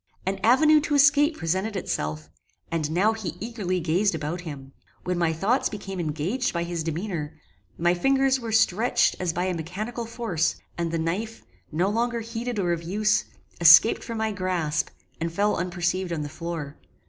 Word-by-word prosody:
An 195 +1 -1
avenue 305 +7 +6
to 295 0 -1
escape 290 +2 +5
presented 190 +6 -1
itself; 75 - -3 0.4
and 160 -3 -1
now 190 +7 +2
he 215 -7 -5
eagerly 205 -5 -2
gazed 175 +3 +1
about 160 +3 -4
him: 140 -5 -8 0.3
when 180 - -1
my 170 -2 +2
thoughts 200 +11 +1
became 195 -3 -6
engaged 170 - -1
by 170 -1 -1
his 170 -1 -3
demeanour, 165 -2 -4 0.4
my 175 +1 +3
fingers 270 +7 +2
were 230 -2 -5
stretched 220 +1 +3
as 180 -2 0
by 175 +2 -2
a 185 - 0
mechanical 210 +8 -5
force, 225 -9 -1 0.2
and 170 -1 -2
the 165 - -1
knife, 195 +8 -3 0.3
no 170 +5 +1
longer 235 +3 0
heeded 230 +1 -4
or 175 -3 +1
of 170 - -3
use, 205 +5 +1 0.3
escaped 175 +6 +7
from 230 - -5
my 220 0 0
grasp, 180 -6 -1 0.3
and 165 0 -2
fell 205 +5 +1
unperceived 180 +1 -1
on 165 -3 -2
the 145 - -4
floor. 160 -2 -6
185 Hz, 170 wpm, -25 LUFS, 165-225 Hz, 0.4 s, escaped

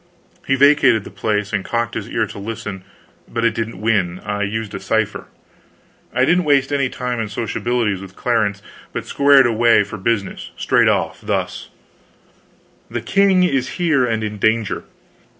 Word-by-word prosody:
He 135 - +3
vacated 135 -5 +4
the - - -10
place 105 -1 -2
and 100 -2 0
cocked 115 -1 -2
his - - -5
ear - - 0
to - - -9
listen 105 -3 -6 0.4
but 115 0 -2
it 115 - +3
didn't 115 -3 -4
win. 100 -5 0
I 105 0 -3
used 105 +1 -3
a - - -4
cipher. 110 -2 -1 0.8
I 125 +2 +2
didn't 180 +4 +3
waste 140 -1 +2
any 135 -2 +1
time 125 -2 -3
in 110 - -2
sociabilities 110 -1 -1
with 95 -1 -11
Clarence, 110 -4 0 0.3
but - - -4
squared 140 -1 +5
away 115 -2 +4
for 105 +2 -8
business, 100 0 -2
straight - - +3
off - - 0
thus: - - -3 1.2
"The - - -3
king 195 -2 +3
is 135 -7 0
here 160 -7 +2
and 115 -2 0
in 105 -1 -4
danger. 110 0 0
115 Hz, 165 wpm, -19 LUFS, 105-130 Hz, 1.2 s, squared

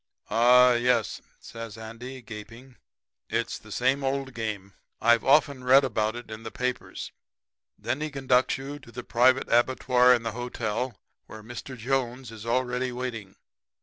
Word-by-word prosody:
"'Ah, 125 +2 +6
yes,' 120 -2 +1 0.2
says 115 -2 -9
Andy, 120 +4 -9
gaping, 115 +3 -11 0.5
'it's - - -2
the - - -15
same 130 +3 +1
old 135 0 -2
game. 105 -4 -5 0.3
I've 120 0 +4
often 140 -1 +3
read 135 +2 +6
about 110 -3 0
it 120 -2 -9
in 110 +1 -7
the 115 - -6
papers. 125 +2 -4 0.7
Then 130 +5 -3
he 155 - -2
conducts 130 -3 +2
you 140 +2 -7
to 125 -4 -15
the 125 0 -7
private 130 +3 +3
abattoir 125 +1 +4
in 120 - -4
the 115 - -2
hotel, 120 -1 -3 0.3
where 110 -1 -10
Mr. 120 +3 -8
Jones 125 0 -2
is 110 0 -10
already 125 +1 0
waiting. 120 -6 -5
125 Hz, 150 wpm, -27 LUFS, 115-130 Hz, 0.7 s, Ah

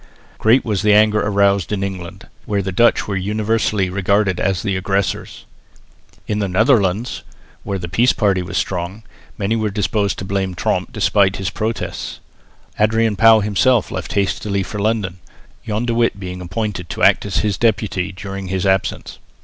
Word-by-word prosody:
Great 115 +4 +4
was 105 -5 -1
the 105 0 +4
anger 105 0 +4
aroused 100 -3 +2
in 100 -2 -1
England, 95 -3 -6 0.2
where 100 -1 0
the 95 - -3
Dutch 120 +5 +3
were 100 - -2
universally 105 0 0
regarded 100 0 +1
as 95 -2 0
the 100 -3 -1
aggressors. 95 +1 -2 0.8
In 105 - -2
the 100 - 0
Netherlands, 105 +1 +1 0.4
where 100 -1 -3
the 85 -2 -5
peace 115 +9 +3
party 100 -3 +1
was 90 +1 -4
strong, 90 +4 -3 0.3
many 105 +2 0
were 110 -1 0
disposed 100 0 -1
to 95 - -5
blame 95 -1 -2
Tromp - - -1
despite 100 -1 +2
his 95 -2 -3
protests. 110 +1 -4 0.6
Adrian 110 0 +2
Pauw 110 +1 +6
himself 105 +4 +2
left - - -5
hastily 100 0 0
for 105 +2 -6
London, 100 -4 -1 0.5
John 110 +2 -1
de 120 - 0
Witt 115 -3 +1
being 90 -1 -6
appointed 90 -1 -4
to - - -4
act - - +5
as 100 - -2
his 100 -3 -1
deputy 105 -5 0
during 95 0 -7
his 95 0 -2
absence. 95 -1 -1
100 Hz, 165 wpm, -19 LUFS, 95-110 Hz, 0.8 s, Pauw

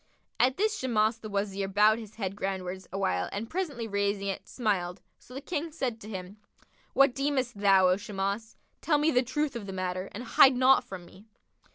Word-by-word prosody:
At 255 +2 +3
this 430 +1 +1
Shimas 225 -3 +1
the 215 - -8
Wazir 200 -1 -2
bowed 210 +3 +4
his 220 -2 -11
head 195 -3 -3
groundwards 190 -2 -4
awhile 185 - -1
and 210 +3 -4
presently 295 -11 -3
raising 200 -1 -1
it, 195 - -5
smiled; 190 -7 -1 0.2
so 250 - -14
the 270 - -5
King 320 +1 -3
said 250 -7 -3
to 210 - -9
him, 190 0 -7 0.6
"What 275 -2 +5
deemest 265 -5 -1
thou, 195 -2 +5
O 180 +1 +3
Shimas? 205 +1 -4 0.3
Tell 300 -3 +2
me 300 +2 +2
the 250 - +4
truth 275 +2 -2
of 215 -4 -6
the 195 - -5
matter 185 0 -3
and 230 - -7
hide 260 +2 +6
naught 260 +1 +5
from 190 -7 -9
me." 195 +5 -17
215 Hz, 195 wpm, -29 LUFS, 195-255 Hz, 0.6 s, hide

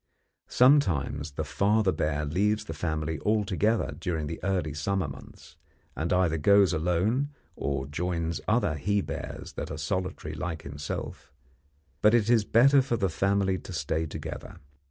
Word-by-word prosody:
Sometimes 80 - +3
the - - -3
father 105 0 +2
bear 75 -3 -1
leaves 105 +7 0
the 80 - -5
family 80 -1 -2
altogether 105 +2 +1
during 85 -5 -2
the 80 +3 -6
early 90 -5 0
summer 90 +3 -1
months, 70 -1 -12 0.4
and 80 +2 -2
either 90 -3 +2
goes 100 +2 +5
alone 90 - +1 0.3
or 70 -1 -2
joins 85 +2 -2
other 110 -7 +2
he 100 +7 0
bears - - -6
that - - -5
are 80 - -5
solitary 80 0 -3
like 80 +1 -4
himself; 70 -1 -6 0.7
but 105 +2 +5
it 115 0 +3
is 115 -3 +4
better 135 +6 +5
for 125 -3 -1
the 100 -3 +1
family 95 +2 +1
to 95 - -9
stay 80 +1 -1
together. - - -7
90 Hz, 150 wpm, -28 LUFS, 75-105 Hz, 0.7 s, goes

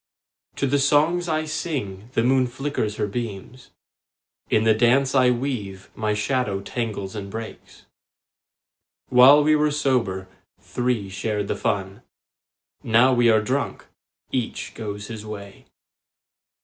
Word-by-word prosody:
To - - -1
the 140 +1 +1
songs 155 +5 +2
I 155 0 0
sing 125 - -4
the 115 - +1
moon 130 +1 +3
flickers 125 -4 -3
her - - -1
beams; 115 +3 -6 0.8
In 110 - +3
the 110 0 +5
dance 125 +4 +3
I 130 -2 +5
weave 120 -7 -3
my 110 -1 -1
shadow 105 -2 -1
tangles 105 -2 -4
and 100 -2 -6
breaks. 110 +2 -9 1.2
While 130 +4 +7
we 155 +1 +4
were 150 0 +2
sober, 125 -11 0 0.3
three 125 -5 -2
shared 100 +1 -3
the - - 0
fun; 95 +2 -2 0.8
Now 120 +3 +4
we 120 -1 +4
are 110 -1 +4
drunk, 135 +6 -2 0.5
each 125 -3 -3
goes 105 -2 -6
his 110 -1 -7
way. 100 -2 -10
120 Hz, 130 wpm, -23 LUFS, 105-135 Hz, 1.2 s, While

